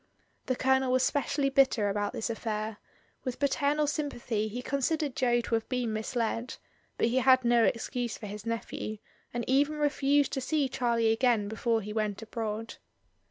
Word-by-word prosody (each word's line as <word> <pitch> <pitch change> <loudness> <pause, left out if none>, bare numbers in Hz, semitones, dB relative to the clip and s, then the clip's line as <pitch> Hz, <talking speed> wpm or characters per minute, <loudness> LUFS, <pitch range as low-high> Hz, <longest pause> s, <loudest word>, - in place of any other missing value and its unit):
The 255 - +1
Colonel 265 0 +2
was 255 0 +3
specially 280 0 +1
bitter 265 -6 +3
about 205 0 -1
this 225 - -3
affair; 215 -1 -3 0.5
with 255 -2 -3
paternal 285 +1 +1
sympathy 250 -8 -2
he 245 +4 -5
considered 280 +1 -1
Jo 240 -2 +2
to 235 - -5
have 225 -1 0
been 245 -3 -1
misled, 230 +2 -2 0.4
but 230 - +2
he 250 - 0
had 260 -1 +5
no 235 -1 +5
excuse 240 0 -1
for 220 - -8
his 205 0 -7
nephew, 230 -1 -4 0.3
and 240 0 -3
even 285 +3 +3
refused 290 -1 +2
to 265 - -1
see 290 +1 +1
Charlie 235 -3 +1
again 225 -3 +2
be 220 - -5
fore 225 0 +1
he 210 +1 -6
went 210 -2 -1
abroad. 225 0 -4
240 Hz, 170 wpm, -29 LUFS, 220-270 Hz, 0.5 s, had